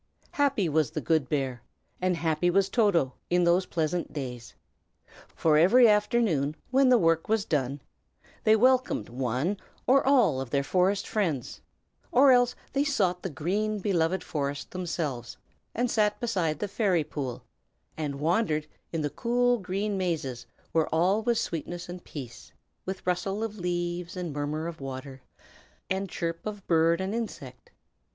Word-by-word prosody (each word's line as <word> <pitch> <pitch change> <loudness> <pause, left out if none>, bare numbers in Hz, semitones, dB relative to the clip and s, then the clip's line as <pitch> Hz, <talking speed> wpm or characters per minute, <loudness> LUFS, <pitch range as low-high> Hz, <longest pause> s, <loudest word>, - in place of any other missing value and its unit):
Happy 275 -10 +1
was 155 -1 +1
the 155 0 -4
good 155 -3 +1
bear, 135 -4 -1 0.4
and 185 -1 +1
happy 160 +1 +1
was 195 +2 +2
Toto, 195 - +2 0.2
in 180 0 +3
those 175 +2 +3
pleasant 165 +1 -1
days. 125 -5 -6 0.7
For 155 -2 +2
every 235 +9 +7
afternoon, 210 - +2 0.2
when 265 0 +4
the 250 - +6
work 165 -3 +2
was 220 -2 +1
done, 140 -2 -1 0.6
they 215 - +5
welcomed 255 - +2
one 130 - -1 0.3
or 270 +2 +5
all 240 - +3
of 135 - -6
their 140 +2 +1
forest 185 +6 +1
friends; 165 - -2 0.5
or 265 +2 +6
else 245 -1 +4 0.2
they 275 +1 +2
sought 190 -11 +1
the 190 - -3
green, 200 +9 -1
beloved 185 -2 0
forest 140 -2 -3
themselves, 155 -9 -4 0.4
and 245 +1 0
sat 210 -2 +2
beside 185 -10 0
the 205 - -3
fairy 195 -5 +1
pool, 135 -5 -5 0.5
and 145 -3 -4
wandered 160 -1 +1 0.3
in 165 - -2
the 145 -1 -2
cool 245 - +1
green 195 +1 -2
mazes 140 -9 -2 0.2
where 160 -1 +2
all 180 +7 +2
was 235 0 +1
sweetness 170 +2 -4
and 175 0 -8
peace, 125 -6 -9 0.4
with 190 0 -5
rustle 195 +4 -1
of 215 -2 -5
leaves 175 0 -3
and 175 -4 -4
murmur 150 +2 -3
of 165 -3 -6
water, 135 0 -7 0.7
and 190 0 -1
chirp 165 0 -3
of 205 -2 -6
bird 165 0 +3
and 190 +2 -2
insect. 140 - -6
175 Hz, 155 wpm, -28 LUFS, 150-210 Hz, 0.7 s, every